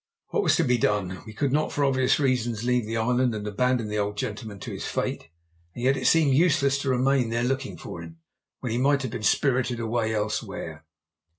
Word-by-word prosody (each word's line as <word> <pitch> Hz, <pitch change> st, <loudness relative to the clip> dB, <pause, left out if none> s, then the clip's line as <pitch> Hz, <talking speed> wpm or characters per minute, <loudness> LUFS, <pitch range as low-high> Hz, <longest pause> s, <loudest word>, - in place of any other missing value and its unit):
What 435 Hz, -, +1 dB
was -, -, +3 dB
to 170 Hz, -, +2 dB
be 125 Hz, -4 st, +2 dB
done? 100 Hz, -4 st, 0 dB
We 110 Hz, -, -8 dB
could 140 Hz, +4 st, -1 dB
not 150 Hz, +3 st, +1 dB
for 145 Hz, -, +1 dB
obvious 130 Hz, 0 st, +2 dB
reasons 120 Hz, -5 st, 0 dB
leave 125 Hz, -2 st, +1 dB
the 115 Hz, +1 st, -2 dB
island 125 Hz, +1 st, +1 dB
and 105 Hz, -1 st, -5 dB
abandon 120 Hz, +2 st, 0 dB
the 105 Hz, 0 st, -2 dB
old 105 Hz, 0 st, -2 dB
gentleman 105 Hz, 0 st, -5 dB
to -, -, -6 dB
his -, -, -5 dB
fate, -, -, -3 dB, 0.5 s
and 120 Hz, -, -6 dB
yet 135 Hz, +2 st, +4 dB
it -, -, -1 dB
seemed 155 Hz, -4 st, +4 dB
useless 140 Hz, -3 st, +3 dB
to 140 Hz, -, -2 dB
remain 130 Hz, -1 st, +2 dB
there 115 Hz, +1 st, 0 dB
looking 135 Hz, +1 st, -2 dB
for 85 Hz, -, -8 dB
him, 85 Hz, 0 st, -11 dB, 0.4 s
when 125 Hz, -, -3 dB
he 120 Hz, -, 0 dB
might 140 Hz, +1 st, +2 dB
have 130 Hz, -, -3 dB
been -, -, -5 dB
spirited 125 Hz, +1 st, +1 dB
away 110 Hz, -1 st, -1 dB
elsewhere. 105 Hz, -5 st, -4 dB
125 Hz, 215 wpm, -26 LUFS, 110-135 Hz, 0.5 s, yet